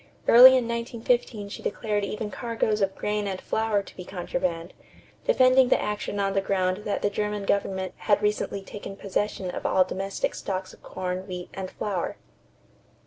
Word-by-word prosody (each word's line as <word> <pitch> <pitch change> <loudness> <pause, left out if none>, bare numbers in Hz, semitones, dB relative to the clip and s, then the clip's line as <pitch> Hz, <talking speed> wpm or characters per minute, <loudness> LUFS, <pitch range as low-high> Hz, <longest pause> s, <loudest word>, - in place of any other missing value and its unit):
Early 260 +2 +10
in 245 -2 -1
1915 235 -2 -1
she - - -7
declared 210 -1 -1
even 210 +1 -4
cargoes 225 -3 -1
of 195 0 +1
grain 210 0 -1
and 190 -1 -3
flour 220 -2 0
to - - -14
be 180 - -7
contraband, 175 -2 -3 0.5
defending 255 - +5
the - - +4
action 210 -1 -3
on 195 -1 +1
the 195 - +2
ground 190 +1 0
that 205 - -2
the 205 - +2
German 210 -1 -2
government 190 -2 -1
had 205 -2 +2
recently 210 -1 -1
taken 195 0 -8
possession 195 -1 -2
of - - -6
all 185 - +4
domestic 195 +2 -3
stocks 185 -1 -4
of - - -18
corn, 185 +1 -4
wheat, 180 -1 -6
and 190 -1 -5
flour. 195 -4 -3
200 Hz, 170 wpm, -26 LUFS, 190-215 Hz, 0.5 s, Early